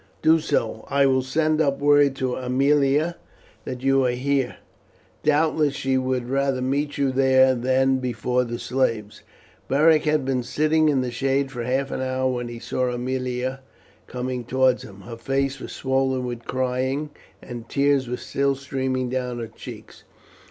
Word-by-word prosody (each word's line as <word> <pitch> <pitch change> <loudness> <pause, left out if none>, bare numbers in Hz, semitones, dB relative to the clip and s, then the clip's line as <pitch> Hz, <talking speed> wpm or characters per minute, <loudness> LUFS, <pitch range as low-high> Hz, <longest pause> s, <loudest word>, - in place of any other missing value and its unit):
"Do 160 +1 +5
so. 115 -8 -1
I 140 0 +3
will 130 -1 +3
send 155 +4 +1
up 140 -3 +1
word 145 -1 +4
to 130 -2 -2
Aemilia 140 +5 +2 0.5
that 130 -1 -6
you 135 0 +3
are 120 - 0
there. 135 0 0 0.7
Doubtless 150 -1 +2
she 135 -1 0
would 130 -1 -1
rather 135 0 0
meet 140 +4 -1
you 140 -2 +1
there 130 0 +4
than 130 +2 +2
before 125 0 0
the 120 -1 -4
slaves." 115 -6 -2 0.5
Beric 155 +3 +4
had 150 -3 +1
been 130 -1 0
sitting 155 +5 +2
in 135 -3 +2
the 125 -1 -3
shade 135 +2 0
for 120 -3 -5
half 135 +2 -1
an - - -3
hour 130 0 0
when 120 -1 -3
he 120 0 -7
saw 125 +2 -2
Aemilia 125 +1 -3 0.5
coming 125 0 -4
towards 130 +1 +2
him. 100 -1 -12
Her 115 +4 -9
face 135 +2 -1
was - - -8
swollen 130 -1 0
with 120 -1 -6
crying, 130 +3 -1 0.3
and 120 -2 -8
the - - -29
tears 140 -1 +2
were 125 +1 -3
still 140 0 0
streaming 130 -1 -2
down 125 -1 -3
her 115 - -4
cheeks. 110 - -11
130 Hz, 165 wpm, -23 LUFS, 125-140 Hz, 0.7 s, Do